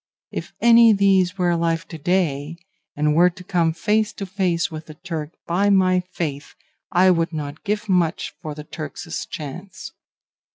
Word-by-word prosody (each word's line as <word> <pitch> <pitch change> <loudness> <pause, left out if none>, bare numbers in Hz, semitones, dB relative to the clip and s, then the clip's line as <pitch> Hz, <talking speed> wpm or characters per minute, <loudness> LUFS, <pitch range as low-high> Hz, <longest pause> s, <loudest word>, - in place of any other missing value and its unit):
If - - -5
any 235 -1 +7
these 195 -2 +3
were 180 -2 +2
alive 165 0 0
to 165 - -7
day, 165 -2 0 0.4
and 150 0 +1
were 175 +3 +5
to 180 +1 -12
come 175 -3 +1
face 210 +6 +1
to 200 - -5
face 180 -3 0
with 155 0 -8
the 155 - -10
Turk, 160 -3 -5
by 195 +4 +1
my 185 -2 +4
faith, 165 -6 -5 0.4
I 185 +1 +5
would 165 -1 +1
not 150 -2 -6
give 210 +1 -2
much 180 -4 0
for 155 -1 -6
the 150 - -8
Turk's 155 +1 -6
chance. 175 +6 -8
175 Hz, 165 wpm, -22 LUFS, 155-190 Hz, 0.4 s, any